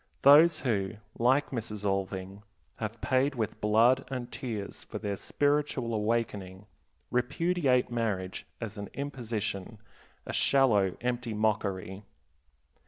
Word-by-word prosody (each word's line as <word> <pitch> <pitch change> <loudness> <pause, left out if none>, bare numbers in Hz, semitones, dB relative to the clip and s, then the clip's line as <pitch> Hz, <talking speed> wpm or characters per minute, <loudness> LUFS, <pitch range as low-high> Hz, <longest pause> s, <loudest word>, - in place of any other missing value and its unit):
Those 150 +5 +7
who, 100 -6 0 0.3
like 130 +5 +3
Mrs. 110 -4 -4
Alving, 95 0 -2 0.4
have 110 +1 -5
paid 135 +1 +2
with 110 -4 -3
blood 115 +5 +4
and 125 -2 -5
tears 110 -6 -5
for - - -7
their 100 -1 -3
spiritual 145 -1 0
awakening, 105 -3 -2 0.5
repudiate 135 0 +1
marriage 105 -6 -2
as 105 -3 -6
an 100 - -6
imposition, 115 -7 -4 0.5
a - - -5
shallow, 105 -9 +3
empty 120 -2 -2
mockery. 100 -3 -1
115 Hz, 110 wpm, -29 LUFS, 100-130 Hz, 0.5 s, Those